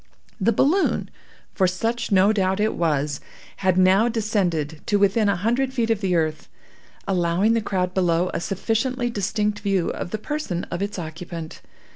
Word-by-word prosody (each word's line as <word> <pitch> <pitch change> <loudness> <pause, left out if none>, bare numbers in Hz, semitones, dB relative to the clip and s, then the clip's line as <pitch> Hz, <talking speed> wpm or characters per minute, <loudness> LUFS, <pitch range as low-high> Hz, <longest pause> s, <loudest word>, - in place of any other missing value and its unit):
The 215 +4 +3
balloon 305 - +1 0.4
(for 190 - +2
such 225 +6 -2
no 195 +2 +5
doubt 190 -1 +1
it 215 +1 +1
was) 150 -4 -1 0.4
had 185 -2 +1
now 190 +4 +5
descended 180 -9 -1
to 205 - +3
within 205 +2 +3
a 200 - +2
hundred 240 +8 0
feet 230 -2 +1
of 220 -2 0
the 185 -3 +1
earth, 155 -2 -1 0.6
allowing 185 +3 +2
the 230 - +1
crowd 185 -3 -1
below 180 -1 +1
a - - -1
sufficiently 240 +6 -1
distinct 210 0 -1
view 195 -4 0
of - - -5
the 215 - -3
person 215 - -3
of 175 - -3
its 205 0 -3
occupant. 165 -1 -7
195 Hz, 165 wpm, -23 LUFS, 175-220 Hz, 0.6 s, no